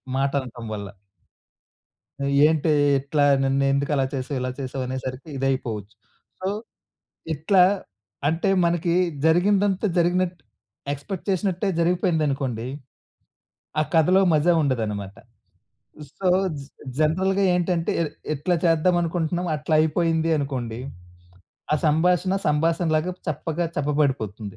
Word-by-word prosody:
మాట 135 +1 +1
అనటం 120 -2 -9
వల్ల. 100 -1 -5 1.3
నువ్, 140 0 -1 0.2
"ఏంటి 155 0 +1 0.3
ఇట్లా 145 +2 0 0.2
నన్ను 135 +1 +1
ఎందుకు 140 +1 0
అలా 135 -1 +2
చేసావు. 135 +1 -3
ఇలా 130 0 -2
చేసావు?" 130 0 -4
అనేసరికి 130 +2 -5
ఇదైపోవచ్చు. 115 -6 -2 0.4
సో 185 - -3 0.9
ఇట్లా, 180 +6 +3 0.7
అంటే 165 +5 0 0.2
మనకి 170 0 +1 0.3
జరిగిందంతా 195 +4 +3
జరిగినట్టు 175 -1 +1 0.5
ఎక్స్‌పెక్ట్ 155 +6 -6
చేసినట్టే 190 +1 0
జరిగిపోయిందనుకోండి, 150 - 0 1.1
ఆ - - +4
కథలో 180 +4 +5
మజా 155 +3 +4
ఉండదన్నమాట. 105 -7 -2 1.0
సో 190 - -1 0.3
జ్ 140 - -9 0.3
జనరల్‌గా 190 +5 +2
ఏంటంటే, 175 -1 0
ఇ - - +2 0.3
ఎట్లా 165 +5 0
చేద్దాం 165 +2 +3
అనుకుంటున్నాం 170 +1 -1
అట్లా 150 +2 -1
అయిపోయింది, 165 +1 +1
అనుకోండి. 125 -5 -4 0.9
ఆ - - +5
సంభాషణ 180 +5 +2
సంభాషణలాగా 160 +2 +1 0.2
చప్పగా 155 +3 -2
చప్పబడిపోతుంది. 135 -9 -1
155 Hz, 105 wpm, -24 LUFS, 135-175 Hz, 1.3 s, కథలో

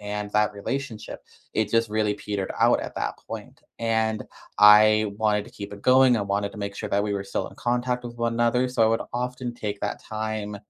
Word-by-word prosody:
and 105 0 -4
that 105 0 +2
relationship, 115 +2 -5 0.3
it 110 -1 0
just 115 0 +2
really 105 -1 +1
petered 100 -2 -4
out - - +5
at - - -7
that - - -2
point, - - -8 0.2
and 110 -1 0 0.4
I 105 0 +7
wanted 105 -1 +1
to - - -14
keep 100 0 -8
it 100 0 -10
going, 130 -1 +5
I 105 - 0
wanted 100 0 -1
to - - -10
make 100 -1 -5
sure 105 - -4
that 100 0 +1
we 105 0 -1
were 100 -1 -2
still 100 - -3
in - - -16
contact 125 0 -1
with 120 0 -7
one 115 0 -1
another, 120 +2 +2
so 125 - -3
I 110 - +6
would 115 +1 +1
often 125 0 -3
take 105 -3 -5
that 105 - -3
time 110 -1 -4
110 Hz, 220 wpm, -25 LUFS, 105-120 Hz, 0.4 s, I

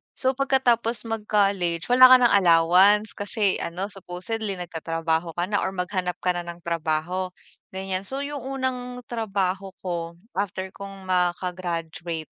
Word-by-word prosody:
So, 260 - +2
pagkatapos 245 -4 +1
mag-college 200 -6 0
wala 255 +1 +9
ka 255 - +9
ng 240 - +5
allowance 190 +3 +5
kasi 205 -1 0
ano, 185 +5 -4
supposedly 195 +3 -4
nagtatrabaho 165 -1 -2
ka 175 - 0
na 205 - +2
or 190 - -2
maghanap 180 -1 -2
ka 180 - +3
na 175 -1 -4
ng 170 0 -8
trabaho, 170 +2 -1 0.5
ganiyan. 190 0 -3
So, 275 +1 -3
yung 290 0 -4
unang 250 -1 -4
trabaho 195 -4 -2
ko 170 -2 -4 0.2
after 190 -1 -3
kong 195 -1 -10
maka-graduate, 175 -3 -2
190 Hz, 135 wpm, -25 LUFS, 175-220 Hz, 0.5 s, wala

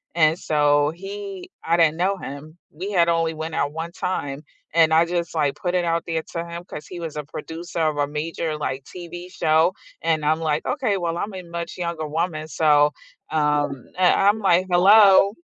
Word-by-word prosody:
and 160 0 +3
so 145 -1 +2
he 195 0 -8
I 165 +1 +2
didn't 160 -2 +3
know 190 +3 +1
him. 155 +1 -9
We 185 +7 -6
had 170 -2 +4
only 165 -1 +1
went 160 +1 -5
out 145 -1 -1
1 165 +1 -5
time, 150 -6 -3 0.3
and 165 -1 +5
I 160 +1 +5
just 170 -1 -3
like 145 -3 +1
put 180 0 -2
it 180 -1 +1
out 165 0 0
there 165 -1 -1
to 170 - -2
him 170 +1 -7
'cause 150 -4 -9
he 180 - -8
was 165 -3 -6
a 150 - -3
producer 165 +4 -6
of 155 -2 +1
a 145 -1 +1
major, 155 +1 -3
like, 135 -2 -4
TV 175 +1 -9
show 160 +1 +2 0.3
and 160 -2 0
I'm 155 +1 +2
like, 155 -2 -1
okay, 250 -9 0
well 170 -2 -2
I'm 200 +4 -4
a 185 - -6
much 170 0 -6
younger 170 -3 -3
woman, 155 0 -2
so, 150 -2 +3 0.4
um 150 -4 0
and 180 -1 +5
I'm 205 +2 +4
like, 185 -3 +3
"Hello," 195 +2 +6
165 Hz, 200 wpm, -23 LUFS, 155-175 Hz, 0.4 s, Hello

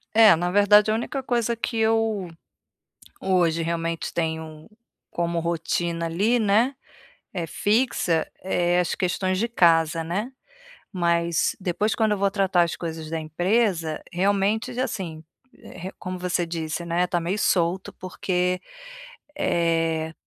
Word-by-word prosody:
É, 220 -5 +8
na 175 +2 -1
verdade 205 +2 +5
a - - +2
única 265 +4 -3
coisa 235 -2 0
que 230 0 -3
eu 220 -4 +1 0.9
hoje 170 -3 +2
realmente 165 0 -2
tenho 160 -1 -4 0.4
como 170 0 -1
rotina, 170 0 -1
ali, 205 +9 +1
né, 225 +5 +2 0.6
é 175 -3 -2
fixa, 205 - +1 0.2
eh, 175 -1 +1
as 175 - 0
questões 185 0 -1
de 230 +4 0
casa, 165 -6 +3
né, 205 +10 -3 0.6
mas 170 -2 +1
depois 190 +4 0
quando 220 -2 +2
eu 205 - 0
vou 200 0 +2
tratar 190 -3 +2
as 170 - 0
coisas 160 -2 -6
da 165 -1 -2
empresa, 175 0 0
realmente 200 +4 +1
já, 255 +1 0
assim, 165 -9 -5 0.3
re 185 +3 -10
como 185 0 -5
você 180 -1 -1
disse, 165 0 -4
né, 170 +1 +1
tá 175 -1 -1
meio 180 +5 -2
solto 180 0 +1
porque, 180 0 -2 0.8
eh, 165 - 0
180 Hz, 135 wpm, -24 LUFS, 165-205 Hz, 0.9 s, É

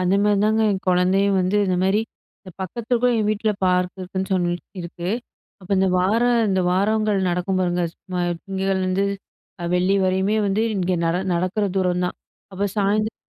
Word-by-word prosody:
அந்த 185 +2 +2
மாரிதாங்க 210 +2 +2
என் 190 -1 -3
கொழந்தையும் 190 +2 +3
வந்து, 185 +3 +1
இந்தமாரி 190 +3 +2 0.4
இந்த 185 - -12
பக்கத்துக்கும் 235 +5 0
என் 215 - +1
வீட்ல 215 +1 0
பார்க் 180 0 +1
இருக்குன்னு 190 +1 -4
சொல்லி 175 -1 +1 0.3
இருக்கு. 170 +1 -6 0.5
அப்போ 185 +2 -5
இந்த 190 0 +3
வார, 195 +6 +2 0.3
இந்த 190 -1 +2
வாரங்கள் 210 +2 +1
நடக்கும் 180 +2 -1
பாருங்க, 175 -1 0
சும்மா 180 -1 -5 0.2
திங்கட்கிழமையில 195 0 -1
இருந்து 185 +2 +1 0.6
அ - - -3
வெள்ளி 185 +2 +2
வரையுமே 190 +3 +1
வந்து, 200 +3 +1
இங்க 185 -1 0
நட 165 +1 +1 0.2
நடக்குற 185 +4 0
தூரம் 180 -1 +1
தான். - - -5 0.4
அப்ப 200 +2 -1
சாயந்தர 210 +2 +1
190 Hz, 160 wpm, -22 LUFS, 180-205 Hz, 0.6 s, கொழந்தையும்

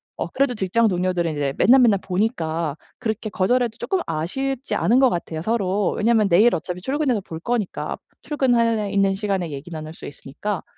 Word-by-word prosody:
어 - - -3
그래도 275 -2 0
직장 215 +3 +2
동료들은 180 -3 0
이제 140 -2 -1
맨날맨날 235 -4 +5
보니까 170 - -1 0.2
그렇게 220 -2 -3
거절해도 230 +4 +1
쪼끔 385 +6 -1
아쉽지 260 - -2
않은 245 +4 +3
것 265 -2 +5
같아요, 165 -3 -4
서로. 200 -1 0
왜냐면 220 -1 +3
내일 210 +8 +5
어차피 180 +2 -5
출근해서 265 -3 0
볼 160 -3 -8
거니까, 220 +1 -2 0.3
출근할래 230 -7 +1
있는 195 -1 +2
시간에 195 -5 -2
얘기 140 +4 -7
나눌 155 -1 -7
수 - - -9
있으니까. 165 +8 -5
200 Hz, 405 characters per minute, -22 LUFS, 175-235 Hz, 0.3 s, 맨날맨날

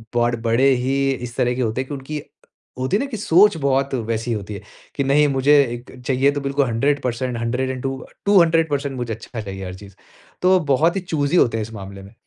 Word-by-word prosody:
बाड़ 120 0 +2
बड़े 115 +3 +2 0.2
ही 135 +1 +1
इस 125 -2 -5
तरह 125 0 +2
के 130 - -2
होते 115 +1 -1
हैं 130 - -7
कि 145 - -6
उनकी 145 +2 -5 0.6
होती 130 +10 +1
है - - -2
ना - - -2
कि 225 - -3
सोच 200 0 +4
बहुत 140 -1 0
वैसी 115 0 -2
होती 105 -1 -5
है 100 - -7 0.3
कि 140 - 0
"नहीं, 145 +2 +4
मुझे 140 +2 +4
इक 120 +1 -9 0.2
चाहिए 135 +1 +3
तो 145 0 -3
बिल्कुल 140 0 0
100%, 125 0 -1
100 125 +3 -1
एंड 130 -1 -4
2 135 -1 -4 0.2
200% 165 -7 +3
मुझे 120 -2 -3
अच्छा 110 +1 -7
चाहिए 95 -2 -7
हर 90 0 -6
चीज़। 100 0 -13 0.5
तो 185 +1 +5
बहुत 160 +6 +3
ही 195 - -1
चूज़ी 160 -2 0
होते 115 -8 +3
हैं - - -1
इस 110 - -9
मामले 100 -1 -9
में। 100 +3 -14
130 Hz, 220 wpm, -21 LUFS, 115-145 Hz, 0.6 s, तो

